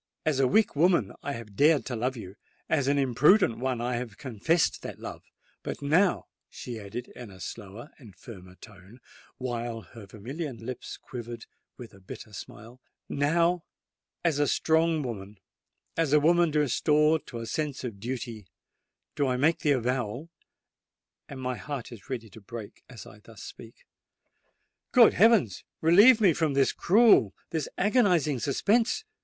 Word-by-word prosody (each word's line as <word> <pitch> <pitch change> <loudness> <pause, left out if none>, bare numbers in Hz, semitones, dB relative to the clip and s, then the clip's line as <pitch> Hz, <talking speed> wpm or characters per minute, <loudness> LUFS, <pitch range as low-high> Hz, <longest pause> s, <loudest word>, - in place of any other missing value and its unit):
"As 150 -4 +1
a 135 - +4
weak 215 - +2
woman, 160 - +3
I 145 - -4
have 115 -4 -9
dared 145 0 +4
to 125 - -4
love 125 +3 -2
you—as 115 +8 -4
an 140 +1 +2
imprudent 135 - +3
one, 130 -1 -1
I 120 +1 -2
have 115 -4 -6
confessed 140 +6 0
that - - -7
love;—but - - -10
now," 175 +7 +2 0.2
she 120 -2 -7
added, 110 +4 -7
in 120 -3 -11
a 95 -1 -14
slower 105 +7 -9
and 110 -8 -15
firmer 90 -2 -12
tone, 100 +4 -15 0.4
while 120 -2 -4
her 105 +3 -13
vermilion 130 - -6
lips 120 +3 -7
quivered 120 -2 -8 0.3
with 120 -3 -11
a 100 - -16
bitter 95 +3 -11
smile,—"now, 145 +11 -2 0.6
as 155 -4 +2
a 145 - +2
strong 160 -1 +2
woman—as 115 - -6
a 150 - +6
woman 170 +2 +3
restored 150 +1 +2
to 120 - -7
a 115 - -5
sense 145 +3 -3
of 115 -6 -6
duty—do 120 - -7
I 125 -1 0
make 155 +6 +2
the 145 - +2
avowal—and 130 +3 -7
my 125 -1 -3
heart 140 -6 -6
is 110 -5 -13
ready 115 -5 -5
to 110 - -13
break 110 0 -10
as 120 -7 -11
I 105 - -14
thus 110 0 -14
speak——" 115 0 -12 1.1
"Good - - +7
heavens! 205 - +3 0.2
relieve 205 +10 +6
me 195 -6 +4
from 155 -3 0
this 135 -1 +3
cruel—this 170 - +3
agonizing 180 - +2
suspense!" 225 - +1
130 Hz, 145 wpm, -27 LUFS, 115-155 Hz, 1.1 s, Good